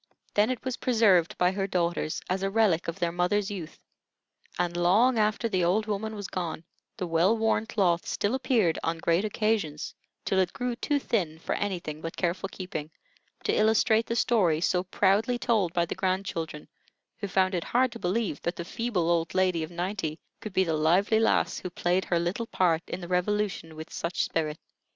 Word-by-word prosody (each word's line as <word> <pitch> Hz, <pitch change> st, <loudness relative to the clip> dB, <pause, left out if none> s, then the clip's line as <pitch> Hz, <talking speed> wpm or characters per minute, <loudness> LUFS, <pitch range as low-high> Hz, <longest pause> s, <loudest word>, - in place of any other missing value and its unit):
Then 210 Hz, +2 st, +3 dB
it 255 Hz, -1 st, -3 dB
was 260 Hz, -1 st, -2 dB
preserved 210 Hz, -9 st, +3 dB
by 180 Hz, 0 st, +3 dB
her 195 Hz, 0 st, -2 dB
daughters, 170 Hz, -3 st, -1 dB
as 185 Hz, +1 st, -1 dB
a 195 Hz, -, 0 dB
relic 200 Hz, -5 st, +2 dB
of 170 Hz, -, -3 dB
their 170 Hz, -3 st, 0 dB
mother's 185 Hz, +4 st, 0 dB
youth, 180 Hz, -6 st, -7 dB, 0.8 s
and 175 Hz, -1 st, -1 dB
long 215 Hz, +8 st, +4 dB
after 215 Hz, +2 st, +1 dB
the 185 Hz, -5 st, 0 dB
old 195 Hz, +5 st, +2 dB
woman 215 Hz, +1 st, -3 dB
was 205 Hz, -2 st, -5 dB
gone, 170 Hz, -3 st, -4 dB, 0.3 s
the 190 Hz, -, -2 dB
well 175 Hz, +6 st, +3 dB
worn 225 Hz, 0 st, +1 dB
cloth 175 Hz, -6 st, +1 dB
still 205 Hz, +3 st, -1 dB
appeared 235 Hz, -, +2 dB
on 165 Hz, 0 st, -1 dB
great 170 Hz, +3 st, +1 dB
occasions, 210 Hz, -8 st, -1 dB, 0.3 s
till 190 Hz, -, +1 dB
it 180 Hz, -2 st, +1 dB
grew 250 Hz, -2 st, -2 dB
too 290 Hz, +4 st, 0 dB
thin 180 Hz, -, -1 dB
for 160 Hz, -, -3 dB
anything 175 Hz, -6 st, -3 dB
but 165 Hz, 0 st, -6 dB
careful 185 Hz, +2 st, -1 dB
keeping, 170 Hz, -6 st, -6 dB, 0.5 s
to -, -, +1 dB
illustrate 220 Hz, +1 st, +3 dB
the 230 Hz, -, -1 dB
story 195 Hz, -10 st, +3 dB
so 180 Hz, +1 st, +1 dB
proudly 200 Hz, +6 st, +2 dB
told 220 Hz, -8 st, +1 dB
by 170 Hz, 0 st, +1 dB
the -, -, -4 dB
grandchildren, 185 Hz, -5 st, -2 dB, 0.5 s
who 200 Hz, -, -4 dB
found 190 Hz, 0 st, +2 dB
it 175 Hz, -2 st, -1 dB
hard 255 Hz, +1 st, +2 dB
to 235 Hz, -, -9 dB
believe 185 Hz, -4 st, -1 dB
that 170 Hz, -, -2 dB
the 170 Hz, -, -5 dB
feeble 205 Hz, -4 st, -1 dB
old 170 Hz, -1 st, +1 dB
lady 185 Hz, -3 st, +2 dB
of 155 Hz, -, -4 dB
ninety 175 Hz, -2 st, -3 dB, 0.2 s
could 215 Hz, -, -7 dB
be 190 Hz, -, +3 dB
the 165 Hz, -3 st, -1 dB
lively 175 Hz, +8 st, +3 dB
lass 225 Hz, -, +2 dB
who 180 Hz, -, -5 dB
played 180 Hz, +1 st, 0 dB
her 175 Hz, -, +1 dB
little 180 Hz, +8 st, -2 dB
part 170 Hz, -6 st, +2 dB
in 185 Hz, -, -5 dB
the 175 Hz, -, -6 dB
Revolution 180 Hz, -2 st, -1 dB
with 160 Hz, 0 st, -9 dB
such 170 Hz, +1 st, -1 dB
spirit. 155 Hz, -1 st, -2 dB
185 Hz, 190 wpm, -28 LUFS, 170-215 Hz, 0.8 s, long